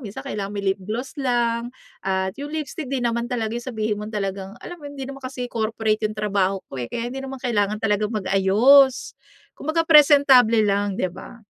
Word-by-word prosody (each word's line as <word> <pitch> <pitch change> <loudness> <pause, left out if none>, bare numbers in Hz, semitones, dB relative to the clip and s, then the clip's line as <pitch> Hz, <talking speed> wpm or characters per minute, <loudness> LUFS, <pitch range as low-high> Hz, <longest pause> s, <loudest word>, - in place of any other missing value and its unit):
minsan 205 -1 -8
kailangan 200 -1 -4
may 200 -1 -4
lip 195 - -14
gloss 225 +7 -5
lang 240 -2 0 0.4
at 190 0 -1
yung 290 +2 -7
lipstick. 315 +1 -4
'Di 265 - 0
naman 235 0 0
talaga 235 -2 -3
yung 240 - -6
sabihin 220 -4 -2
mong 210 +1 -7
talagang 195 -2 -4
alam 350 - -8
mo - - -13
yun, 285 - -7
hindi 270 -1 -6
naman 275 0 -8
kasi 255 -1 -5
corporate 220 -1 -1
yung 215 - 0
trabaho 195 -2 0
ko, - - -9
eh, 120 - -4
kaya 235 0 -3
hindi 270 +2 -6
naman 270 -1 -7
kailangan 215 -4 0
talagang 210 0 0
mag-ayos. 215 +7 +4 0.4
Kumbaga 315 +3 -1
presentable 280 -7 +6
lang, 200 -1 0
di 185 - +1
ba? 190 +6 -12
225 Hz, 195 wpm, -22 LUFS, 205-260 Hz, 0.4 s, presentable